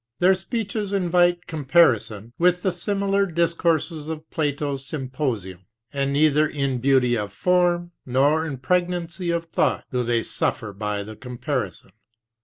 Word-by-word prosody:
Their 185 +2 +5
speeches 205 +1 -3
invite 175 -2 +2
comparison 130 - +2
with 180 +1 +3
the 190 - +2
similar 200 +2 0
discourses 165 -2 0
of 160 0 -6
Plato's 145 -2 -2
Symposium, 130 - -4 0.3
and 140 0 0
neither 150 +1 +3
in 140 -4 -2
beauty 130 -1 +3
of 105 -3 -3
form 175 - +1
nor 140 +5 +2
in 145 -4 -4
pregnancy 175 +4 -1
of 170 0 0
thought 165 - 0
do 125 -1 0
they 115 -1 +1
suffer 105 -2 -2
by 105 0 -3
the 110 +2 -9
comparison. 125 +1 -4
155 Hz, 135 wpm, -23 LUFS, 130-175 Hz, 0.3 s, Their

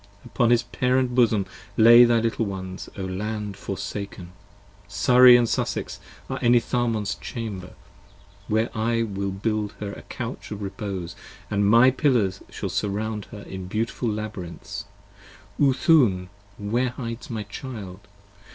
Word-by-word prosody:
Upon 120 -3 +1
his 120 0 +4
parent 125 +1 0
bosom 115 -5 +3 0.3
lay 120 +2 +9
thy 120 -1 +3
little 115 -1 -1
ones, 95 -1 -6
O 95 - -4
Land 105 +2 -4
25 - - -14
Forsaken. 95 -1 -5 0.6
Surrey 125 0 +7
and 120 -1 +2
Sussex - - -2 0.3
are - - -4
Enitharmon's 120 -3 +1
Chamber, 100 -6 -6 0.7
Where 110 +2 0
I 115 +1 +1
will 100 -2 -3
build 105 +1 -2
her 100 -1 -6
a - - -9
Couch - - -7
of 105 -1 -6
repose 95 -4 -5 0.3
& - - -26
my 110 +5 +5
pillars 120 -9 +1
Shall - - -5
surround 105 +1 -2
her 105 -3 -10
in 95 -1 -7
beautiful 115 +4 -2
labyrinths: 100 -2 -6 0.8
Oothoon? 130 - +4 0.3
Where 120 +5 0
hides 115 -2 -6
my 110 -3 -3
child? 100 -3 -8
110 Hz, 135 wpm, -24 LUFS, 100-120 Hz, 0.8 s, lay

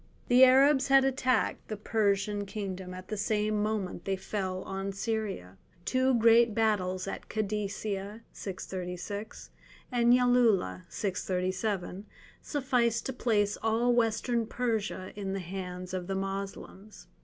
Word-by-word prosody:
The 250 +1 +7
Arabs 270 +2 +6
had 270 -1 +6
attacked 255 -3 0
the 215 - -4
Persian 205 -1 0
kingdom 190 -3 -5
at 185 0 -9
the 215 - -3
same 210 0 0
moment 210 -5 -2
that - - -28
they 195 - 0
fell 190 -1 -3
on 195 0 -4
Syria: 195 - -3 0.3
two 260 0 +2
great 230 -1 +5
battles 190 -4 +1
at - - -6
Kadesia 210 0 -3 1.7
and 240 -1 +3
Yalulah 235 - +3 1.6
sufficed 250 -5 0
to 265 - -3
place 210 -4 +1
all 230 +2 +2
Western 235 0 +1
Persia 220 -6 -2
in 195 -2 -4
the 195 - -2
hands 180 0 -6
of 180 -1 -3
the 195 - -2
Moslems. 195 +1 -6
210 Hz, 120 wpm, -30 LUFS, 195-235 Hz, 1.7 s, The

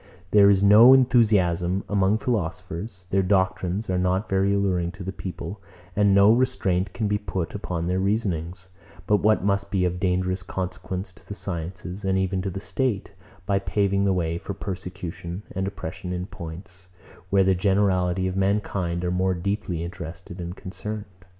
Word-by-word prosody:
There 100 -1 +7
is 100 -1 +4
no 110 +6 +9
enthusiasm 100 -8 +3
among 100 +1 +2
philosophers; 95 -2 -3
their 95 - +3
doctrines 95 +1 0
are 90 -1 0
not 95 +3 +1
very 95 +1 +2
alluring 95 -3 0
to 90 - -8
the 95 - -3
people; 95 +2 -7 0.3
and 100 -1 +4
no 100 +2 +7
restraint 100 -7 +1
can 110 - -2
be 105 0 0
put 95 -4 -4
upon 90 -5 -3
their 90 +2 0
reasonings, 95 -3 -2 0.4
but 105 +2 +4
what 105 -1 +2
must 100 0 0
be 95 -2 +1
of 90 0 -1
dangerous 95 0 0
consequence 95 +1 -5
to - - -21
the 105 - -6
sciences, 90 +1 -5
and 95 0 +1
even 95 0 0
to 95 - -2
the 95 - -5
state, 110 0 -1 0.3
by 100 -2 +2
paving 100 0 +1
the 100 - +3
way 85 -2 -1
for 100 - -6
persecution 90 -1 -6
and 95 +1 -2
oppression 95 -1 -6
in 90 0 -3
points, 90 0 -10 0.4
where 95 0 +4
the 95 0 +4
generality 95 -1 +2
of 95 - -3
mankind 95 -3 0
are 90 - 0
more 95 +1 +1
deeply 90 -2 -2
interested 85 0 -7
and 85 +1 -5
concerned. 105 +2 -6
95 Hz, 170 wpm, -25 LUFS, 90-100 Hz, 0.4 s, no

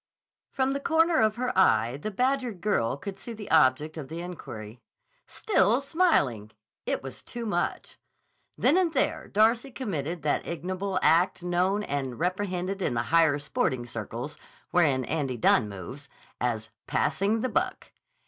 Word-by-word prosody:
From 265 0 0
the 275 - -1
corner 325 +1 +3
of 215 -1 +3
her 250 +2 -2
eye 120 -10 +4
the 150 - -4
badgered 250 -1 0
girl 140 - 0
could 195 +5 -7
see 235 - -7
the 210 -2 -9
object 155 +1 +3
of 145 -4 -6
the 165 +3 -6
inquiry. 120 -11 -8 0.5
Still 235 - +2
smiling! 275 - +1 0.4
It - - -1
was 135 - -8
too 235 -1 -7
much. 175 -5 -2 0.6
Then 335 - +4
and 360 -3 +2
there - - 0
Darcy 225 +5 +3
committed 175 - -4
that 150 - 0
ignoble 185 +3 -3
act 175 +2 +3
known 180 +4 +1
and 135 - -3
reprehended 185 +1 -2
in 125 - 0
the 115 - 0
higher 160 -3 +5
sporting 130 -4 -1
circles, 120 +4 -6 0.3
wherein 145 -8 +3
Andy 140 -6 -2
Dunne 110 -1 +3
moves, 115 +9 -9 0.3
as 110 -3 -2 0.2
"passing 210 +3 +1
the 255 - -1
buck." - - -2
175 Hz, 150 wpm, -27 LUFS, 135-215 Hz, 0.6 s, higher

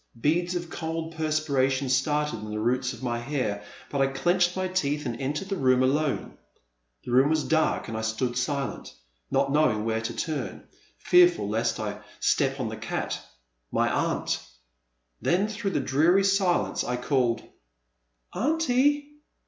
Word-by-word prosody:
Beads 175 +7 +1
of 175 -1 -4
cold 160 0 -4
perspiration 140 -4 +1
started 150 -1 +1
in 105 0 -7
the 105 0 -3
roots 125 +3 +1
of 120 -1 -10
my 120 -1 -1
hair, 120 -6 -2 0.3
but 140 - 0
I 135 - +4
clenched 175 +6 +1
my 185 0 0
teeth 150 -5 -1
and 120 +1 -4
entered 150 +8 -2
the 195 - 0
room 130 -5 +3
alone. 145 +2 0 0.7
The - - -5
room 130 +4 +5
was 155 -1 +2
dark 160 -1 +1
and 110 - -5
I 110 - -2
stood 110 +3 -1
silent, 135 - -3 0.3
not 135 0 +1
knowing 130 -8 +2
where 110 0 0
to 115 - -4
turn, 150 -5 -4 0.3
fearful 175 - +4
lest 110 +3 0
I - - -4 0.2
step - - +1
on - - -1
the - - -6
cat, - - -3 0.5
my - - +2
aunt - - 0
I - - -19 0.7
Then 185 +4 +2
through 215 -1 -3
the - - 0
dreary 170 +8 +3
silence 195 -2 +2
I 125 - -2
called; 125 -2 +1 0.9
Aunty! 290 - +2
145 Hz, 160 wpm, -27 LUFS, 125-175 Hz, 0.9 s, room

